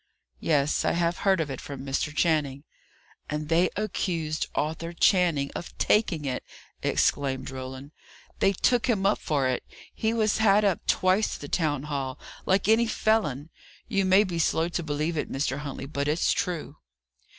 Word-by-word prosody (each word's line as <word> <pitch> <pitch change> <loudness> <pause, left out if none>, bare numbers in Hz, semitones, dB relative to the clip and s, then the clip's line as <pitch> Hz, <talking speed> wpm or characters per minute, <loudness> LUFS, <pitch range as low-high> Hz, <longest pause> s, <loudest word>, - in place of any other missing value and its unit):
"Yes. 145 - +1
I - - +1
have 170 0 0
heard 195 -2 +3
of 150 -3 -2
it 135 - -6
from 140 -1 -7
Mr. 135 +2 -1
Channing." 150 -3 0 0.7
"And 150 0 -3
they 170 +2 +3
accused 170 -7 -2
Arthur 160 +3 -2
Channing 170 -6 +3
of 175 - -8
taking 180 -8 +2
it!" 130 -2 -2 0.4
exclaimed 135 -2 0
Roland. 130 +2 -7 0.5
"They 195 - +4
took 240 +6 +1
him 200 -5 +1
up 200 - +3
for 140 -4 0
it; 130 - -1 0.3
he 220 - 0
was 220 -2 +1
had 210 -1 +4
up 195 -4 0
twice 185 +3 +2
to - - -11
the 145 - -6
town 150 -5 0
hall, 140 -3 -3 0.3
like 190 0 +2
any 225 +2 +4
felon. 165 - 0 0.4
You 195 0 +1
may 190 +2 +5
be 175 -4 -3
slow 165 +1 +1
to 175 - -2
believe 155 +1 -2
it, - - -4
Mr. 135 0 -1
Huntley, 145 -2 -6
but 140 0 -3
it's 155 +3 +2
true." 170 -5 -3
160 Hz, 170 wpm, -27 LUFS, 145-190 Hz, 0.7 s, may